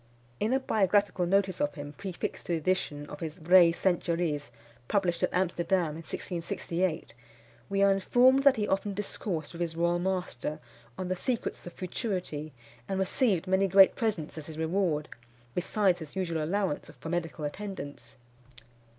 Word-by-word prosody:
In 215 - +1
a 265 - +3
biographical 205 -5 +2
notice 195 0 +2
of 145 0 0
him, 145 0 -7
prefixed 185 +2 -5
to 175 - 0
the - - +2
edition 155 -3 -1
of 150 - -9
his 160 -2 -5
Vraies 175 0 +6
Centuries, 170 -5 0 0.4
published 180 -1 +1
at - - +1
Amsterdam 180 -1 +1
in 150 - -6
1668, 170 -1 -3 0.6
we 195 0 +2
are 200 - +6
informed 245 +7 +4
that 280 -1 +6
he 210 -2 -1
often 195 +1 0
discoursed 185 -6 -3
with 170 - -7
his 165 -1 -2
royal 170 +1 +1
master 180 -6 -2 0.4
on 185 -1 -3
the 185 - 0
secrets 235 -1 -3
of 175 - -8
futurity, 180 - -3 0.4
and 195 - -1
received 190 - +1
many 190 +1 +3
great 195 +1 +7
presents 185 -9 -2
as 150 - -9
his 160 -1 -8
reward, 160 -2 0 0.5
besides 185 0 +1
his 155 -3 -9
usual 170 -4 -1
allowance 185 -1 -1
for 160 - -6
medical 165 -3 -2
attendance. 145 -5 -6
180 Hz, 160 wpm, -29 LUFS, 160-195 Hz, 0.6 s, great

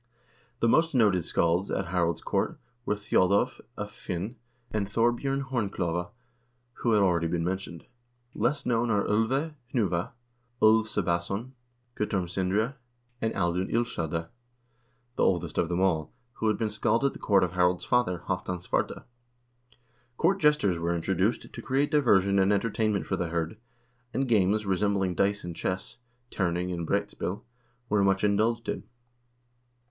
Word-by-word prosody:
The 115 - +4
most 160 +5 +3
noted 100 -8 +3
scalds 85 +3 +1
at - - -2
Harald's 85 -2 0
court - - -1 0.3
were: 105 - +2
Thjodolv 100 +3 +2 0.2
af 105 0 -5
Hvin 90 +6 -3 0.4
and 105 -2 -1
Thorbj0rn 120 +6 +1
Horn 125 -7 -1
klove, 85 -1 -2 0.7
who 115 - +2
have 105 -2 +4
already 85 -3 +2
been 85 0 -1
mentioned. 90 -1 -4 0.5
Less 140 +4 0
known 120 -1 +1
are 105 -2 +2
01 110 +2 +2
ve 140 +6 -1 0.2
Hnuva, 95 -7 0 0.5
Ulv 110 +1 +5
Sebbason, 100 +4 -1 0.4
Guttorm 95 -4 -1
Sindre, 100 - 0 0.4
and 110 - +1
Audun 90 0 0
Illskelda, 85 -9 -1 0.9
the - - 0
oldest 85 -3 +1
of 85 - +1
them 90 0 0
all, 80 -5 +1 0.2
who 110 - -2
had 110 - +2
been 110 -2 -1
scald 115 +4 +1
at 140 - +2
the - - -10
court 100 -3 +3
of 90 - 0
Harald's 90 0 +1
father, 100 -9 +1
Halvdan 90 -1 -2
Svarte. - - -1 1.1
Court 195 +4 +2
jesters 150 - +3
were 85 +1 0
introduced 95 +6 -1
to - - -7
create 135 +2 0
diversion 100 -9 +4
and 95 +1 +4
entertainment 105 0 +1
for 95 - -1
the 90 - -1
hird, 85 +2 -2 0.6
and 135 0 +1
games, 105 -1 +2
resembling 95 -1 +1
dice 100 +3 +1
and 85 -1 -6
chess 95 +3 -3 0.3
(terning 90 -1 -1
and 85 -2 -4
broetspil), 95 +3 -2 0.4
were 105 -3 +2
much 95 0 +2
indulged 110 +3 +1
in. - - -2
100 Hz, 150 wpm, -28 LUFS, 90-115 Hz, 1.1 s, Ulv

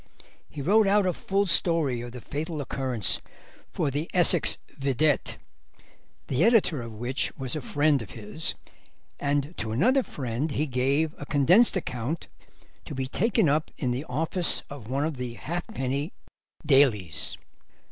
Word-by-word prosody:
He 145 - -6
wrote 205 +6 +4
out 200 0 +3
a 180 - +1
full 195 +3 0
story 165 -8 +2
of 120 0 -7
the 125 0 -9
fatal 155 +5 -4
occurrence 130 -6 -1 0.5
for 140 - -1
the 145 +4 -3
Essex 175 -2 +5 0.2
Vedette, 140 +2 0 0.9
the 130 - 0
editor 215 - +3
of 115 -1 -7
which 120 +5 0
was 130 0 -3
a 155 - -3
friend 145 0 +2
of 105 - -9
his, 115 +8 -3 0.6
and 145 +3 -1
to 110 - -3
another 250 - +3
friend 140 - -4
he 150 - 0
gave 140 +4 0
a 145 - -6
condensed 175 - +4
account, 130 -1 -4 0.6
to 145 - -7
be 130 0 -2
taken 215 - +1
up 150 +2 +1
to 125 -4 -1
the 125 +3 -2
office 160 +6 +1
of 125 -6 -9
one 140 +3 0
of 155 -3 -3
the 125 -2 -5
halfpenny 150 - -4 0.5
dailies. 115 - +2
145 Hz, 150 wpm, -26 LUFS, 125-165 Hz, 0.9 s, Essex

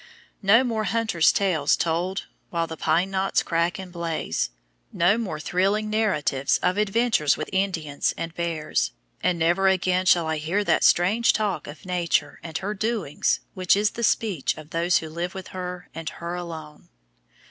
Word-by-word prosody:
No 220 +5 +5
more 225 -4 -1
hunters' 220 -6 +3
tales 170 -8 +2
told 175 +4 -1 0.2
while 170 -1 -1
the 165 - -7
pine 165 +5 +1
knots 195 0 +1
crack 170 +4 0
and 190 -2 -8
blaze; 165 - -2 0.4
no 175 +4 +3
more 205 -9 -3
thrilling 200 +6 0
narratives 150 -11 +1
of 180 0 +2
adventures 210 -7 +2
with 155 - -5
Indians 170 -7 0
and 165 0 -4
bears; 165 -3 -1 0.3
and 180 0 +1
never 175 +4 +2
again 185 -1 +2
shall 175 -2 +5
I 160 0 -1
hear 170 +7 0
that - - +2
strange 210 +7 +4
talk 205 -7 -1
of 145 +3 -10
Nature 175 -5 0
and 160 -2 -5
her 205 +2 -3
doings 210 -7 -1
which 185 +1 +3
is 210 +1 +2
the 235 - -5
speech 205 -9 +1
of 155 +1 -11
those 170 +2 +2
who 160 - -4
live 170 +4 -4
with 190 -1 -7
her 180 -1 -6
and 165 -1 -5
her 170 0 -6
alone. 160 -4 -8
180 Hz, 170 wpm, -24 LUFS, 165-195 Hz, 0.4 s, No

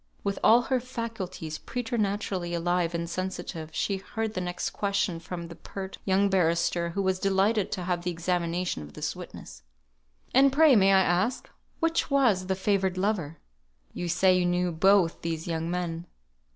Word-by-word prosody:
With 200 -1 -2
all 235 +2 +6
her 260 0 +1
faculties 220 -10 -5
preternaturally 205 -7 -2
alive 175 0 0
and 170 0 -2
sensitive, 175 -2 -4
she 200 - -1
heard 220 +3 -4
the 185 - -2
next 180 0 -3
question 200 -4 -1
from 170 +1 -6
the 170 - -9
pert 190 +3 -8
young 195 +1 +3
barrister, 170 -2 +1
who 195 +4 -2
was 190 -1 +1
delighted 195 +2 +1
to 185 - -3
have 175 -1 -1
the 175 - -2
examination 175 - -1
of 75 0 -10
this - - -3
witness. - - -10 0.7
"And 275 +1 +6
pray, 295 -1 +6
may 195 -2 +5
I 190 -1 +6
ask, 190 +8 0 0.3
which 330 0 +1
was 235 -10 +3
the 190 - +1
favoured 190 -1 0
lover? 185 -6 -1 0.6
You 175 - -4
say 185 +2 +4
you 180 - +1
knew 175 0 +1
both 180 +1 +3
these 165 -1 -3
young 165 -1 -2
men. 175 -1 -3
185 Hz, 165 wpm, -27 LUFS, 170-200 Hz, 0.7 s, all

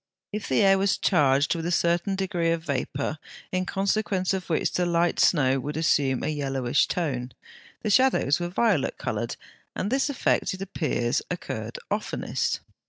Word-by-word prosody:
If 210 -1 -4
the 130 - +3
air 195 -1 +5
was 195 0 +2
charged 145 -4 +3
with 165 -1 -3
a - - -1
certain 170 +3 +1
degree 180 -3 -1
of 165 -1 0
vapour, 140 +1 -2 0.3
in 185 0 -1
consequence 195 -1 0
of 190 -1 -4
which 160 - +1
the 180 - 0
light 170 0 +1
snow 135 -5 +3
would 145 +3 -4
assume 140 -5 +2
a - - -1
yellowish 135 -4 0
tone, 130 -8 -2 0.5
the 215 - 0
shadows 255 - +3
were 175 0 -2
violet 195 - +1
coloured, - - -3 0.4
and 200 - -2
this 270 +2 +1
effect, 260 -7 0
it 190 - -11
appears, 155 -10 -1
occurred - - -5
oftenest. - - -2
170 Hz, 165 wpm, -26 LUFS, 145-195 Hz, 0.5 s, air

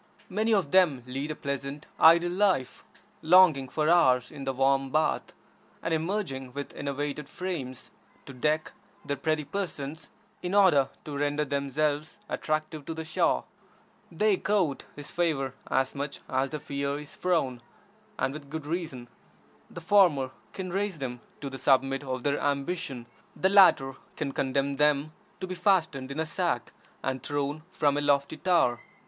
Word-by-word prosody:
Many 215 +4 0
of 190 -9 +2
them 160 -10 +4
lead 135 +4 -4
a 155 - -3
pleasant, 140 +1 -4
idle 170 +2 +7
life, 185 -8 +1 0.4
lounging 160 -6 +6
for 155 +2 0
hours 130 -8 +4
in 140 - -8
the 135 - 0
warm 135 +1 +2
bath, 155 +3 0 0.5
and 165 - 0
emerging 160 -7 -2
with 145 0 -6
enervated 145 +1 -4
frames 150 -10 -5 0.3
to 135 - -9
deck 150 +4 0 0.3
their 140 - -1
pretty 155 +2 0
persons 155 -3 -5 0.3
in 180 +2 -2
order 155 -10 +5 0.2
to 150 - -5
render 145 +1 0
themselves 145 +4 -1
attractive 155 0 -2
to 165 - -4
the 160 0 -5
Shah. 155 - +1 0.7
They 200 +4 +2
court 180 -10 0
his 145 -1 -8
favor 150 -7 0 0.2
as 130 0 +1
much 140 0 -5
as 130 +1 0
they 150 - -4
fear 140 -1 -3
his 150 -1 -10
frown, 150 -9 0 0.6
and 135 - 0
with 145 -2 -9
good 160 0 -5
reason. 155 -7 -4 0.6
The 170 - -9
former 165 -8 +4 0.2
can 185 -2 -5
raise 195 -1 -1
them 125 -4 -5 0.2
to 140 - -4
the 135 - -7
summit 135 0 +2
of 130 -2 -4
their 145 0 +1
ambition; 140 -2 -2 0.3
the 190 - +2
latter 185 -9 +6 0.2
can 145 -3 -3
condemn 140 +1 -1
them 150 +1 +2 0.3
to - - -1
be 185 - -5
fastened 165 -9 +1
in 145 - -4
a 160 - +1
sack 155 - -2 0.3
and 130 -1 -2
thrown 145 +2 -2
from 145 -5 +1
a - - +1
lofty 140 -1 +1
tower. 165 -10 +2
145 Hz, 160 wpm, -28 LUFS, 135-170 Hz, 0.7 s, idle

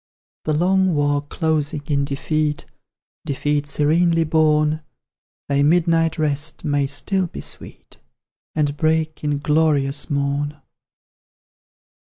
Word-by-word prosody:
"The 155 - +1
long 185 +2 +2
war 145 -1 +1
closing 150 0 -1
in 140 -1 0
defeat 150 +2 -1 0.6
Defeat 145 +1 -1
serenely 165 +4 +2
borne, 155 -1 +2 0.7
Thy 140 0 +1
midnight 165 +1 +2
rest 150 +1 -1
may 145 -2 +1
still 185 +6 0
be - - -8
sweet, - - -9 0.6
And 145 -2 0
break 155 0 0
in 145 -1 0
glorious 150 -1 +1
morn!" 145 +1 -1
150 Hz, 105 wpm, -21 LUFS, 145-160 Hz, 0.7 s, long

